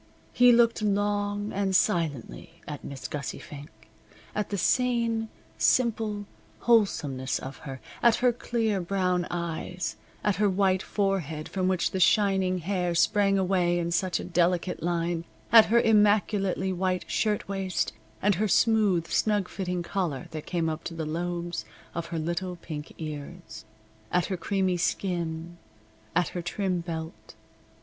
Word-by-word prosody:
He 245 0 +7
looked 235 -1 +4
long 205 0 0
and 195 -1 0
silently 145 - 0
at 150 -2 -6
Miss 140 -2 -6
Gussie 145 -2 -4
Fink 145 0 -10 0.6
at 210 - -2
the 200 - -2
sane, 230 +1 +1 0.3
simple, 220 -4 +2 0.4
wholesomeness 150 - +2
of 135 +1 -7
her, 135 -2 -8 0.2
at 235 -1 +5
her 245 -1 +3
clear 225 -4 -1
brown 180 -1 0
eyes, 175 +1 -3 0.3
at 205 -4 +1
her 210 0 +3
white 190 -1 +2
forehead 185 -8 -1
from 185 -1 -1
which 185 -2 +1
the 190 - -2
shining 190 -1 +3
hair 180 0 -1
sprang 195 +3 +3
away 180 -2 +2
in 170 0 -1
such 180 +1 +1
a - - -5
delicate 180 0 0
line, 170 0 -1 0.3
at 225 -1 +9
her 235 +2 +4
immaculately 205 -3 +3
white 185 0 -1
shirtwaist, 195 -3 -1 0.3
and 205 +1 +4
her 215 - +3
smooth, 210 -5 +3
snug 205 +1 +1
fitting 180 -2 -3
collar 170 -8 -2
that 155 -1 -7
came 170 -2 0
up 160 0 -3
to 165 - -5
the 160 -1 -3
lobes 175 +2 -3 0.3
of 170 0 -4
her 170 -1 -4
little 170 +3 -2
pink 155 -3 -7
ears, 145 -8 -7 0.5
at 180 -1 +2
her 190 - -2
creamy 190 0 0
skin, 170 -2 -2 0.6
at 175 -1 +2
her 175 - -4
trim 180 +1 -1
belt. 165 -1 -7
185 Hz, 145 wpm, -27 LUFS, 170-205 Hz, 0.6 s, at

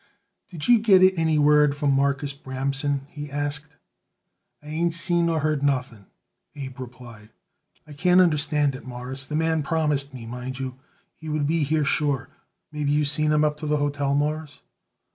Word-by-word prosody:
"Did 165 -6 -6
you 240 -2 +6
get 195 -4 +5
it 185 0 +6
any 160 -2 +1
word 150 -1 +4
from 145 -2 +1
Marcus 140 +1 0
Bramson?" 135 +1 -2
he 145 -1 -8
asked. 145 +1 -4 0.9
"I 150 - -11
ain't 165 +2 0
seen 170 0 +1
nor 165 -2 0
heard 155 -1 0
nothing," 125 -7 -1 0.5
Abe 135 -3 -8
replied. 120 -4 -11 0.6
"I 150 - -12
can't 180 +4 +3
understand 150 -4 +3
it, 135 - -9
Mawruss; 130 +1 -5
the 150 - -5
man 160 0 +1
promised 150 -2 -1
me, 125 -4 -9
mind 125 +2 -6
you, 130 -1 -5 0.3
he 160 - -10
would 150 -1 0
be 165 +2 +1
here 155 +1 +1
sure. 145 -2 0 0.4
Maybe 150 -1 -1
you 150 0 +2
seen 150 +1 +1
him 150 0 +3
up 150 -1 +1
to 155 0 -5
the 150 0 +1
hotel, 145 -1 0
Mawruss?" 150 +1 -2
145 Hz, 175 wpm, -24 LUFS, 135-155 Hz, 0.9 s, you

